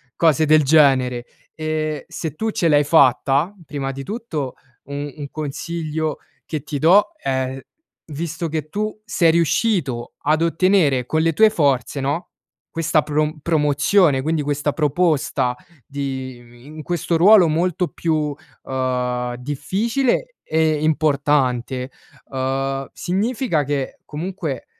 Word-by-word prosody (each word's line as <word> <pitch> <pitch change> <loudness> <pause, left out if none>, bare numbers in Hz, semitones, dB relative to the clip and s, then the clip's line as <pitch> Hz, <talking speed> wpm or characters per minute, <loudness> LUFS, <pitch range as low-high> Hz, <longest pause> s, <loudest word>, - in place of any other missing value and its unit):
cose 160 -2 +3
del 155 0 +5
genere 130 -5 +3 0.3
e 155 -1 -3
se 160 -3 -5
tu 220 +7 -2
ce 170 -5 0
l'hai 145 -1 +4
fatta, 140 +3 +3
prima 140 -2 -4
di 135 0 -7
tutto, 195 - -4 0.3
un 145 +1 -5
un 140 -2 -6
consiglio 155 +1 -3 0.3
che 155 -4 -4
ti 145 -2 -4
do 195 +7 +5
è, 130 0 -2 0.5
visto 165 +2 -4
che 155 -1 -3
tu 215 +3 -3
sei 170 -7 +3
riuscito 170 - 0
ad 155 +2 +2
ottenere, 165 -6 +2
con 155 +3 0
le 165 0 +2
tue 220 +6 +6
forze, 140 - +1
no, 145 +5 -2 0.4
questa 165 -1 +1
prom 150 +1 -1
promozione, 150 -1 +2
quindi 160 0 0
questa 145 0 -1
proposta 150 -5 +1 0.3
di 130 -3 -5
i 120 +1 -18
in 155 +1 -9
questo 170 0 -1
ruolo 195 +1 +7
molto 175 +3 0
più, 155 -3 -1 0.3
uhm, 125 -2 -2
difficile 230 - -1
e 155 -1 +1
importante, 140 -4 +1 0.4
uhm, 135 +1 -2
significa 200 - -1
che 140 -1 -3
comunque 160 -4 -5
150 Hz, 125 wpm, -21 LUFS, 135-170 Hz, 0.5 s, ruolo